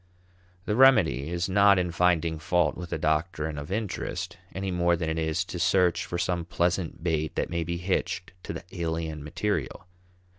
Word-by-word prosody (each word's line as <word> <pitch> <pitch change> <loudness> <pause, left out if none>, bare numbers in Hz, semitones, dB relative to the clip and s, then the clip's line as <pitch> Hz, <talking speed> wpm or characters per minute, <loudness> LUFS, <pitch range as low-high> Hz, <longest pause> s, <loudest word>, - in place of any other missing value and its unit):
The 105 - 0
remedy 85 - +5
is 85 0 -1
not 100 +1 +5
in 90 -1 0
finding 85 -2 +2
fault 90 +3 +1
with 90 -1 -7
the - - -2
doctrine 80 -1 -1
of 70 +4 -8
interest, 105 -1 -3 0.2
any 95 0 -3
more 85 -1 +2
than 80 -1 -2
it 80 - -2
is 80 +3 0
to 90 - -6
search 90 -2 +3
for 85 - -4
some 85 0 -1
pleasant 85 0 -1
bait 80 -3 -1
that - - -1
may 85 -1 -1
be 85 +1 -3
hitched 90 0 -2
to - - -4
the - - -7
alien 80 -3 -3
material. 80 -1 -2
85 Hz, 180 wpm, -27 LUFS, 80-90 Hz, 0.2 s, remedy